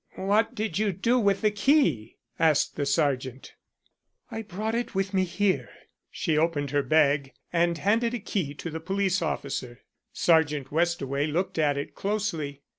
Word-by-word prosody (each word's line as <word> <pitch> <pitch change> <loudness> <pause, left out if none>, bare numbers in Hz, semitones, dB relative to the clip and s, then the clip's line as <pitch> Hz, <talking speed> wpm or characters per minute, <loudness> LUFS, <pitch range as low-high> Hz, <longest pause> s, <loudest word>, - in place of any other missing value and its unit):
"What 205 +3 +1
did 210 -4 -2
you 215 -1 +2
do 235 +8 +2
with 200 -3 +2
the 215 -1 +3
key?" 210 - +2 0.2
asked 155 -3 +3
the 145 -2 -2
Sergeant. 135 -3 -1 0.8
"I 225 0 -4
brought 215 +2 -4
it 235 -2 -2
with 195 0 -1
me 190 -1 +2
here." 190 +2 0 0.4
She 155 -4 0
opened 150 -4 0
her 145 0 +2
bag 145 -2 +2 0.2
and 170 0 +2
handed 230 +6 +1
a - - -3
key 180 -8 -3
to 165 - -6
the 160 - -4
police 190 +2 0
officer. 125 -6 -4 0.3
Sergeant 150 -5 +2
Westaway 150 -3 0
looked 165 +2 -2
at 145 -2 +2
it 140 - -5
closely. 170 -9 -3
170 Hz, 160 wpm, -27 LUFS, 145-205 Hz, 0.8 s, the